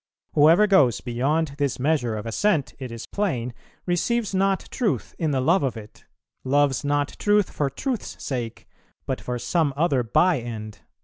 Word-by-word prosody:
Whoever 165 +7 +6
goes 170 - +4
beyond 140 +6 0
this 140 -3 0
measure 130 -5 0
of 105 - -6
assent, 150 - 0
it 130 -3 -6
is 115 0 -7
plain, 130 - -2 0.3
receives 205 +5 0
not 195 0 +2
truth 230 -6 -1
in 160 -3 0
the 135 -2 +1
love 170 +9 +3
of 135 -4 -1
it; 105 -1 -12 0.4
loves 140 0 +2
not 145 0 +1
truth 205 -2 +2
for 145 -2 -1
truth's 240 - -4
sake, 120 -4 -5 0.4
but - - -3
for 125 0 -3
some 145 +5 +1
other 145 -5 +2
by 160 +7 +3
end." 110 -3 -7
145 Hz, 165 wpm, -24 LUFS, 125-180 Hz, 0.4 s, Whoever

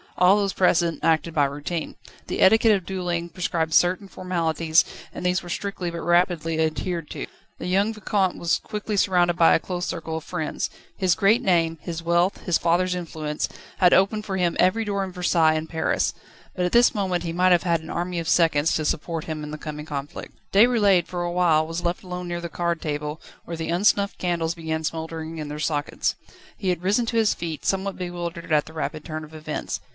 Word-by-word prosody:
All 180 +3 +6
those 200 -2 0
present 170 -4 +2
acted 165 0 +2
by 145 -3 +3
routine. 145 +4 -4 0.3
The - - -3
etiquette 220 +3 +6
of 190 -4 -1
duelling 175 -2 -2
prescribed 165 -2 -2
certain 185 +4 +3
formalities, 165 -4 +1 0.3
and - - -6
these 180 +1 +2
were 175 - -10
strictly 195 -2 -3
but 170 0 -5
rapidly 175 -2 +1
adhered 160 +1 -1
to. - - -4 0.3
The - - -5
young 200 +4 +2
Vicomte 200 -3 0
was 170 - +1
quickly 210 -1 -4
surrounded 175 -3 +3
by 170 -1 +5
a - - +2
close 180 +1 -4
circle 160 -1 -4
of 160 - -6
friends. 165 -4 -3 0.3
His 185 -3 +2
great 215 +5 +4
name, 165 -7 +2
his 170 -1 -5
wealth, 170 +3 +2
his 175 -3 +2
father's 175 +2 +2
influence, 155 -4 -3 0.3
had 180 -1 +5
opened 210 +3 +3
for 190 -2 -2
him 175 -2 +1
every 205 +5 +3
door 200 -1 -1
in 190 - -5
Versailles 175 -3 +3
and 155 +1 -3
Paris. 160 -1 0 0.4
At 180 -1 0
this 240 +2 +5
moment 185 -4 -1
he 165 -1 -3
might 185 +2 +3
have 175 -1 +4
had 170 -2 +1
an 160 - -11
army 175 0 -2
of 165 -1 -3
seconds 165 -2 +3
to 155 - -1
support 160 +1 -2
him 155 -1 -4
in 150 - -6
the 155 - -5
coming 150 -1 -7
conflict. 145 -2 -6 0.2
Déroulède 200 -5 +4
for 175 -1 -3
a 175 - -2
while 170 -3 +3
was 165 +2 -4
left 175 +2 -1
alone 180 -1 -5
near 175 0 -3
the 170 - -5
card 170 0 -1
table, 150 0 -4 0.2
where 170 - -5
the 160 0 -4
unsnuffed 200 +3 +2
candles 170 -2 -1
began 160 -1 -3
smouldering 160 0 -4
in 155 -1 -5
their 150 +1 -6
sockets. 150 -2 -1 0.4
He 190 - -2
had 180 -1 -1
risen 210 +5 +2
to 230 - -1
his 220 -2 +3
feet, 165 -2 -6
somewhat 195 0 -1
bewildered 175 -2 -5
at 150 -1 +3
the 160 - -12
rapid 155 -1 -4
turn 155 0 -5
of 155 +1 -12
events. 155 -1 -4
175 Hz, 205 wpm, -24 LUFS, 160-185 Hz, 0.4 s, All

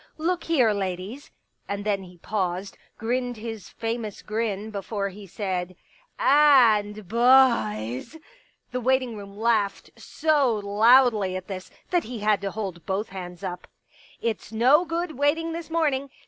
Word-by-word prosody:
" - - -39
Look 350 -2 -4
here, 260 -9 +3
ladies 195 +7 -4 0.2
" - - -42
and 200 0 -3
then 200 -2 0
he 180 -1 -13
paused, 185 0 -3 0.2
grinned 245 +1 -2
his 220 -3 -7
famous 225 -2 -4
grin 215 -1 -3
before 200 0 -3
he 200 +1 -11
said 185 -1 -3 0.2
— - - -30
" - - -45
and 235 - +4
bhoys.'^ 230 - +3 0.5
The 250 0 -2
waiting 255 -1 +1
room 200 -1 -10
laughed 215 -3 0
so 290 -7 +1
loudly 210 -1 +4
at 185 0 -6
this 190 -2 -7 0.2
that 355 -1 +2
he 240 +1 -6
had 210 -2 +2
to 200 - -2
hold 190 -5 -5
both 195 +3 -2
hands 180 -1 -8
up. 180 -2 -5 0.3
" - - -26
It's 220 -2 -3
no 260 +10 +4
good 335 -4 -3
waiting 325 +3 +1
this 335 0 -6
morning. 290 -4 0
220 Hz, 160 wpm, -25 LUFS, 195-260 Hz, 0.5 s, and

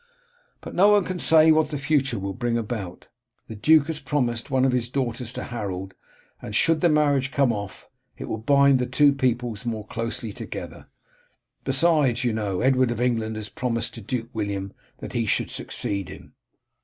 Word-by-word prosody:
But - - -9
no 190 +3 +5
one 205 -3 +4
can 185 -1 -4
say 160 0 +6
what 155 -1 +3
the 150 - -3
future 140 -4 0
will 100 0 -4
bring 120 0 -1
about. 105 -6 -5 0.4
The 110 - -8
duke 150 +7 +4
has 160 -1 -4
promised 125 -5 -1
one 130 -1 +2
of 130 - +3
his 120 -2 -1
daughters 125 -3 -3
to - - -5
Harold, 95 -5 -5 0.5
and 105 - -6
should 165 +6 +3
the 175 - +4
marriage 145 -3 +2
come 135 -3 +2
off 100 -3 -7 0.3
it - - -6
will 110 - -4
bind 140 +2 +4
the 125 - -1
two 140 +3 +4
peoples 125 -4 -1
more 110 -3 -4
closely 115 -1 -4
together. - - -8 0.8
Besides, 135 -3 +2
you 120 -2 +1
know, 100 -4 -2
Edward 130 -1 +3
of 120 -1 -3
England 115 -3 0
has 110 -1 -5
promised 115 -2 -2
to 115 - -9
Duke 115 +2 -4
William 100 -3 -3 0.2
that - - -8
he 115 -2 -1
should - - 0
succeed 100 -2 -3
him." - - -12
125 Hz, 185 wpm, -24 LUFS, 110-140 Hz, 0.8 s, say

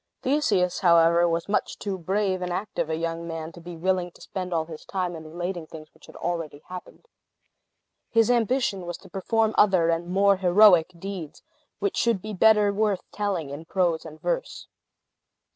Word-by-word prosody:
Theseus, 215 -11 +1
however, 170 -1 +5
was 165 0 -1
much 205 - -1
too 200 -2 -3
brave 190 +1 0
and 180 0 -3
active 185 -2 -3
a 160 - 0
young 165 +1 -3
man 165 -1 -5
to 170 - -13
be 170 0 -9
willing 180 +1 0
to - - -19
spend 185 -1 -5
all 165 -2 0
his 160 -1 -10
time 180 -2 -3
in 160 -1 -9
relating 175 0 -4
things 155 -1 -12
which - - -19
had - - -14
already 165 -4 -4
happened. 180 - -10 1.0
His 230 +1 +3
ambition 235 -5 0
was 175 - -4
to 190 - -17
perform 220 +4 0
other 185 -5 +4
and 170 +1 0
more 195 +2 +3
heroic 185 -2 +5
deeds, 185 -4 -7 0.3
which 405 -2 -2
should 235 -4 +2
be 215 +3 -7
better 210 0 +4
worth 205 -2 0
telling 190 -9 -2
in 150 +3 -7
prose 175 -2 0
and 155 -1 -11
verse. - - -3
180 Hz, 175 wpm, -25 LUFS, 165-205 Hz, 1.0 s, however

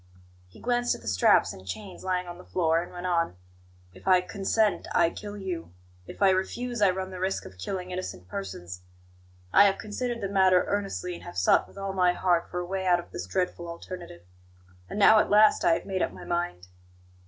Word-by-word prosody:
He 90 - -17
glanced 245 0 +1
at - - -12
the - - -11
straps 95 -3 +4
and 95 - -12
chains 185 - -7
lying 185 -1 -1
on 175 0 -9
the - - -11
floor, 165 -3 +1
and 175 - -9
went 175 0 -7
on: 170 - 0 0.6
"If 95 - -15
I 185 -1 +6
consent, 200 +3 0
I 170 -1 +4
kill 205 0 -8
you; 180 - -5 0.3
if - - -4
I 195 - +6
refuse, 235 +5 -2
I 200 - +6
run 190 +1 -3
the 185 - -7
risk 190 +1 -1
of 95 -1 -12
killing 185 - -4
innocent 95 - -6
persons. 90 -2 -6 0.7
I 200 - +8
have 195 -1 +3
considered 235 +3 -4
the 200 - -1
matter 190 -2 +4
earnestly, 195 -3 -2
and 170 - -9
have 90 - -9
sought 90 - +3
with - - -18
all 195 -1 -3
my 180 -2 +3
heart 175 -2 +1
for 180 - -5
a 175 - -3
way 190 +1 -3
out 175 -1 +4
of 175 - -10
this 90 - -6
dreadful 175 - -2
alternative. 170 - -9 0.7
And - - -5
now 215 +1 +7
at - - +1
last 210 +1 +5
I 170 - +5
have - - -2
made 190 -2 -2
up - - 0
my - - -10
mind." 170 - -2
180 Hz, 215 wpm, -27 LUFS, 170-195 Hz, 0.7 s, I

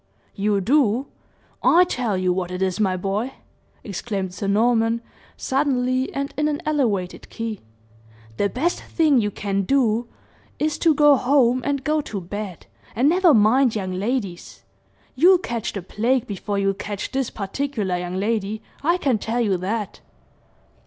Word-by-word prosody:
"You 200 -1 0
do? 255 +1 +2 0.6
I 350 +2 +6
tell 245 - -1
you 185 -1 +1
what 180 -1 -2
it 180 +1 -2
is, 190 +1 -1
my 190 -3 +1
boy," 200 +8 -2 0.5
exclaimed 195 -2 -4
Sir 200 - -4
Norman, 225 +2 +2 0.4
suddenly 260 -2 0
and 280 +1 -4
in 300 0 +1
an 295 -1 -1
elevated 225 -12 -1
key, 225 -2 -5 0.8
"the 200 - +1
best 320 - -1
thing 300 -7 +2
you 210 - 0
can 200 -1 -2
do 235 +1 +1 0.5
is, 305 0 -1
to 325 -3 +4
go 295 -1 +6
home 255 -1 +3
and 280 -2 -1
go 305 +2 +1
to 210 -8 -5
bed, 190 0 -7 0.3
and 255 +6 +3
never 355 0 +5
mind 235 +1 +4
young 190 -3 -2
ladies. 200 -2 -3 0.5
You'll 360 +8 +6
catch 235 - -4
the 195 - -6
plague 235 +6 0
before 200 0 -4
you'll 195 0 +1
catch 205 0 -5
this 265 -2 -1
particular 210 -2 -3
young 180 0 -4
lady 215 +1 -1 0.2
I 340 +5 +2
can 265 - +1
tell 230 +4 -1
you 205 -5 +2
that!" 205 +3 -3
225 Hz, 155 wpm, -22 LUFS, 200-275 Hz, 0.8 s, I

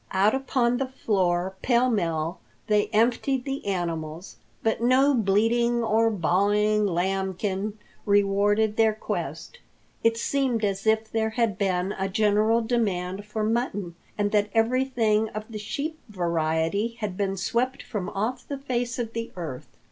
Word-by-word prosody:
Out 195 +3 +4
upon 255 -2 +1
the 270 0 -1
floor 190 -7 0
pell 245 0 +3
mell 165 -7 -1 0.3
they 210 -1 +2
emptied 245 +4 +1
the 275 0 -3
animals, 170 -2 -3 0.3
but 225 0 0
no 260 +4 +4
bleating 235 +2 +2
or 225 +1 +3
baahing 205 +3 +2
lambkin 190 +3 -1 0.3
rewarded 205 +1 +3
their 220 -1 +4
quest. 485 - -5 0.4
It 230 0 +3
seemed 245 -3 0
as 195 +1 -2
if 220 0 +2
there 220 -1 +1
had 225 -2 0
been 190 -1 0
a 190 0 -1
general 215 +3 +3
demand 200 -5 -1
for 215 0 -3
mutton 215 -5 -1 0.2
and 205 -1 0
that 210 -1 +2
everything 225 -2 +2
of 215 - -3
the 215 - -5
sheep 300 +9 -4
variety 170 +4 0
had 210 -4 -3
been 195 0 -1
swept 250 +7 -1
from 200 -4 -4
off 235 +6 -3
the 280 - -4
face 245 -3 -2
of 230 -2 -3
the 230 0 -4
earth. 160 -8 -6
215 Hz, 145 wpm, -26 LUFS, 195-235 Hz, 0.4 s, Out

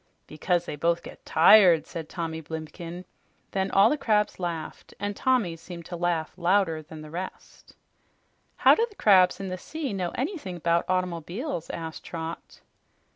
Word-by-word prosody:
"Because 175 +3 -1
they - - -5
both 170 +3 0
get - - -12
tired," 175 -1 +7
said 165 -3 -7
Tommy 165 -2 -4
Blimken. 165 +3 -7 0.5
Then 190 0 -1
all 195 +1 +6
the 300 - 0
crabs 210 -5 +1
laughed, 170 -3 -5
and 205 0 -3
Tommy 235 -10 +1
seemed 170 0 -10
to 175 - -6
laugh 170 -2 -1
louder 175 -3 +2
than 155 0 -11
the 155 - -11
rest. 180 +3 -8 0.8
"How - - +6
do 455 - +2
the 410 - -18
crabs 190 - +5
in 195 -1 -4
the 185 0 -5
sea 290 - -5
know 185 -3 -2
anything 260 - -4
'bout 170 0 +1
automobiles?" 180 - -2
asked 160 -1 -6
Trot. 165 -1 -7
175 Hz, 160 wpm, -26 LUFS, 165-195 Hz, 0.8 s, tired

